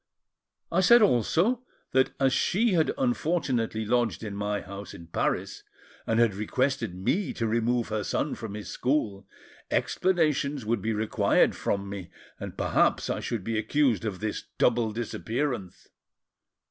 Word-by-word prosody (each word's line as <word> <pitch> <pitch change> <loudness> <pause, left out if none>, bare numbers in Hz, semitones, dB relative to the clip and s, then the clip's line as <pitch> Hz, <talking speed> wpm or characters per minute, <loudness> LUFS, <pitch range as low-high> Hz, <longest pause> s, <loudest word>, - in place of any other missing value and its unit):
I 170 - +2
said 235 +5 +7
also 185 - +2 0.3
that, 130 0 +3
as 135 -1 +3
she 210 - +2
had 160 -3 +3
unfortunately 150 - 0
lodged 120 0 0
in 105 -2 -5
my 105 0 -1
house 100 +1 -8
in 85 - -11
Paris, 85 - -2 0.5
and 115 0 +2
had 115 -3 +4
requested 125 +1 -1
me 160 - 0
to 115 - -2
remove 115 +1 +1
her 110 -1 -1
son 145 - -1
from 110 -3 -6
his 105 - -7
school, 110 -8 -1 0.4
explanations 150 - +1
would 110 -1 0
be 110 - -1
required 110 0 +2
from 100 0 -2
me, 100 -3 -7 0.3
and - - -7
perhaps - - +2
I - - -2
should 115 -5 -3
be 115 +1 -1
accused 115 -2 +1
of 100 -4 -4
this 110 -1 -2 0.2
double 115 -2 +2
disappearance. 115 -1 -3
115 Hz, 145 wpm, -27 LUFS, 105-145 Hz, 0.5 s, said